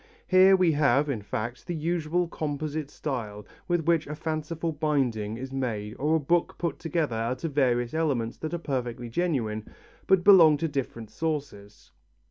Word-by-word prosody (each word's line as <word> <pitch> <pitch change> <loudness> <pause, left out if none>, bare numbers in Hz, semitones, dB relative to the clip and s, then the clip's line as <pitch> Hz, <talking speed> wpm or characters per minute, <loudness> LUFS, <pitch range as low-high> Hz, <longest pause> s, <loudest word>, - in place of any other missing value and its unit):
Here 190 +1 +6
we 180 -3 +3
have, 145 -1 +2
in 115 -6 -3
fact, 115 - -5
the 175 - -2
usual 170 +2 -1
composite 150 -1 -4
style 110 -9 -5 0.2
with 175 -3 0
which 165 -2 +2
a 150 - -5
fanciful 160 +1 -3
binding 130 -8 -1
is 130 +2 -7
made 110 -6 -3
or 150 +3 +2
a - - +3
book 170 +4 +1
put 170 -4 -3
together 160 -6 -1
out 115 +3 -2
of 165 -3 -3
various 120 -4 +1
elements 140 -8 -1
that 160 +2 -4
are - - -1
perfectly 125 -6 -4
genuine, 115 -8 -1 0.4
but 190 -2 +4
belong 170 -7 +8
to 165 - -1
different 125 -6 -4
sources. 140 -11 -5
150 Hz, 165 wpm, -27 LUFS, 120-165 Hz, 0.4 s, belong